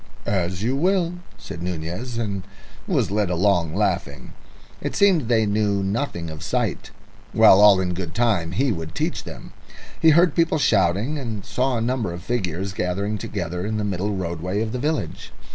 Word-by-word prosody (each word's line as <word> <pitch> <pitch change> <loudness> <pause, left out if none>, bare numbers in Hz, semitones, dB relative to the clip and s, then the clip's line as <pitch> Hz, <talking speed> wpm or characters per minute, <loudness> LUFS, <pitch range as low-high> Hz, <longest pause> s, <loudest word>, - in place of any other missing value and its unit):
"As 90 -1 -1
you 125 +4 +1
will," 175 +2 +1 0.2
said 80 - -9
Nunez, 90 +8 -4
and 100 -4 -2 0.5
was - - +1
led 105 -2 +1
along, 90 -2 +1
laughing. 90 -10 -2 0.5
It - - -3
seemed 185 - +3
they 115 -2 +3
knew 100 -1 +1
nothing 95 - -2
of 80 - -9
sight. - - -2 0.5
Well, 95 - +7
all 105 -2 +7
in 90 -1 -1
good 85 -2 -5
time 105 -9 +1
he 135 0 +1
would 80 -5 -5
teach - - -2
them. - - -10 0.5
He 160 - +6
heard 170 +1 +5
people 165 -1 +2
shouting, 105 - +2
and 110 -7 -5
saw 130 0 0
a - - -1
number 120 -5 -1
of 85 0 -8
figures 95 -4 -2
gathering 100 +4 -2
together 90 -3 -4
in 110 +2 -2
the 105 - -1
middle 100 +1 -2
roadway 90 +2 -2
of 110 - -4
the 125 - -3
village. 150 +3 -3
100 Hz, 175 wpm, -23 LUFS, 90-120 Hz, 0.5 s, Well